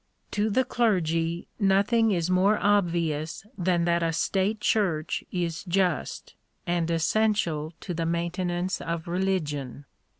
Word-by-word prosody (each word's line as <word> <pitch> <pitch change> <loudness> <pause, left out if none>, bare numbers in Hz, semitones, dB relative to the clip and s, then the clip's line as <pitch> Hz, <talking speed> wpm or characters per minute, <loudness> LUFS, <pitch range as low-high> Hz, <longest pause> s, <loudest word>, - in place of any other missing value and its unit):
To 210 +1 0
the 260 +5 +2
clergy 170 -8 0
nothing 205 +3 +3
is 175 -5 +1
more 185 +3 +3
obvious 170 -6 0
than 175 -3 +1
that 170 0 +2
a 165 -1 +1
state 195 +6 0
church 185 -8 0
is 170 -3 -2
just, 180 -3 -1 0.3
and 170 -1 0
essential 170 -3 +1
to 180 - -4
the 165 0 -2
maintenance 175 +2 -1
of 165 0 -4
religion. 155 -7 -2
175 Hz, 125 wpm, -26 LUFS, 165-195 Hz, 0.3 s, nothing